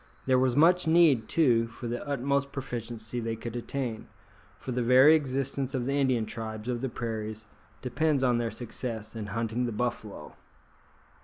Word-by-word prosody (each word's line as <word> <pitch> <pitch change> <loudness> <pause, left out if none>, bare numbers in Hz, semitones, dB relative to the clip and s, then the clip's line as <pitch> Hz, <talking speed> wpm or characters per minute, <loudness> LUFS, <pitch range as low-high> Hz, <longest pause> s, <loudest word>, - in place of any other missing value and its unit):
There 130 -1 +4
was 130 -1 +2
much 175 +4 +4
need, 160 -9 +4
too, 120 -8 +3
for 120 +1 -10
the 120 +1 -3
utmost 140 0 0
proficiency 120 -3 -5
they 115 -1 -2
could 115 +1 -7
attain, 120 -2 -4 0.5
for 130 - -6
the 125 0 -1
very 130 +5 +7
existence 135 -1 -2
of 125 -2 -1
the 135 - -1
Indian 130 -5 +2
tribes 110 0 -6
of 120 -1 -2
the 135 - -2
prairies 110 -2 -5 0.4
depends 140 +2 +1
on 120 -2 +3
their 115 -1 -1
success 115 -2 -6
in 110 -2 -5
hunting 115 +3 -2
the - - -3
buffalo. 110 -2 -4
125 Hz, 165 wpm, -28 LUFS, 115-135 Hz, 0.5 s, very